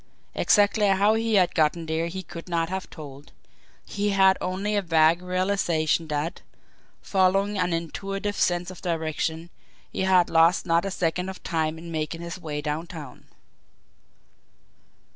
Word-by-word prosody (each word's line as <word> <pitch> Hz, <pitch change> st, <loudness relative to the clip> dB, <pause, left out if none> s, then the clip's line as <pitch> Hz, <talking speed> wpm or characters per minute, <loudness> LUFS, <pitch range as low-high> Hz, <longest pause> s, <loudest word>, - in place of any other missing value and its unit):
Exactly 205 Hz, 0 st, +3 dB
how 200 Hz, +2 st, +4 dB
he 225 Hz, 0 st, +1 dB
had 185 Hz, -3 st, +3 dB
got 155 Hz, -2 st, +3 dB
there 165 Hz, 0 st, -2 dB
he 190 Hz, +2 st, -6 dB
could 170 Hz, +1 st, -10 dB
not 165 Hz, -1 st, 0 dB
have 190 Hz, 0 st, -4 dB
told; 145 Hz, -2 st, -11 dB, 0.5 s
he 205 Hz, 0 st, -2 dB
had 190 Hz, -1 st, +5 dB
only 195 Hz, +3 st, -2 dB
a 205 Hz, -, +2 dB
vague 165 Hz, -1 st, +3 dB
realisation 180 Hz, -4 st, 0 dB
that, 150 Hz, +2 st, -3 dB, 0.6 s
following 195 Hz, +1 st, +2 dB
an 180 Hz, -1 st, +1 dB
intuitive 195 Hz, +5 st, -3 dB
sense 175 Hz, 0 st, 0 dB
of 185 Hz, -, -12 dB
direction, 165 Hz, 0 st, -2 dB, 0.4 s
he -, -, -3 dB
had 185 Hz, -2 st, +4 dB
lost 165 Hz, +3 st, +4 dB
not 170 Hz, +1 st, +2 dB
a -, -, -1 dB
second 180 Hz, 0 st, -1 dB
of 190 Hz, -, -9 dB
time 160 Hz, -1 st, -1 dB
in 170 Hz, +1 st, -9 dB
making 160 Hz, +1 st, -3 dB
his 170 Hz, +2 st, -6 dB
way 150 Hz, -2 st, -4 dB
downtown. 150 Hz, -2 st, -6 dB
175 Hz, 145 wpm, -25 LUFS, 160-190 Hz, 0.6 s, had